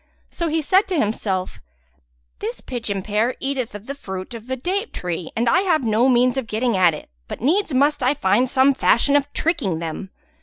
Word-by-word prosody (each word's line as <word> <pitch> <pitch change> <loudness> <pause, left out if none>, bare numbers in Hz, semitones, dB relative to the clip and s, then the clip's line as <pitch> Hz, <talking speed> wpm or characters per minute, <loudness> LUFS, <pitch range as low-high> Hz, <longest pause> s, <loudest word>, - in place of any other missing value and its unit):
So 340 - -2
he 320 0 0
said 380 +7 +3
to 370 - -1
himself, 205 -6 -2 0.8
"This 235 - -4
pigeon 220 -6 -4
pair 215 +5 0
eateth 265 -5 -2
of 205 +1 -9
the 280 - -5
fruit 190 -7 -7
of 230 0 -9
the 260 - -2
date 380 - -3
tree 175 -1 -4
and 235 +2 0
I 335 - +4
have 345 -7 +1
no 230 +3 +3
means 250 +1 +3
of 245 - -6
getting 225 +1 0
at 180 -4 +4
it; - - -10 0.2
but - - -6
needs 335 - +1
must 285 +3 +2
I 260 +4 +2
find 240 +1 +2
some 270 +1 +4
fashion 275 +1 +3
of 285 0 +1
tricking 285 - 0
them. 165 +4 -5
250 Hz, 200 wpm, -21 LUFS, 210-285 Hz, 0.8 s, I